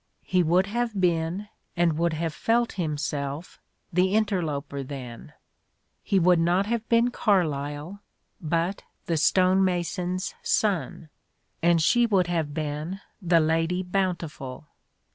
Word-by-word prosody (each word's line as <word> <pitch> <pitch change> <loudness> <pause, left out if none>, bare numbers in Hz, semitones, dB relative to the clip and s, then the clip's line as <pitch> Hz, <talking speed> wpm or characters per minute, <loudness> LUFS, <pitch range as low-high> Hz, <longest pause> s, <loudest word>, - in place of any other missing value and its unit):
He 185 -1 +2
would 175 +3 +3
have 230 0 -2
been, 175 +2 0 0.3
and 170 -2 +3
would 170 +1 +1
have 160 0 -2
felt 235 +5 +1
himself, 150 -2 -3 0.3
the 185 +3 +2
interloper 160 -10 -1
then 130 -4 -8 0.4
— - - -48
^he 195 - +3
would 180 0 +4
not 175 +4 +2
have 230 +1 -2
been 235 +1 +3
Carlyle 155 -3 -1 0.4
but 170 +4 -1 0.2
the 170 - 0
stone 185 +4 +4
mason's 180 0 -1
son, 185 -6 0 0.5
and 170 0 +4
she 235 +9 +4
would 195 -5 +3
have 165 -4 -1
been 155 +4 -4 0.2
the 170 -2 +4
Lady 165 +3 +1
Bountiful. 170 -8 -3
175 Hz, 125 wpm, -26 LUFS, 155-190 Hz, 0.5 s, would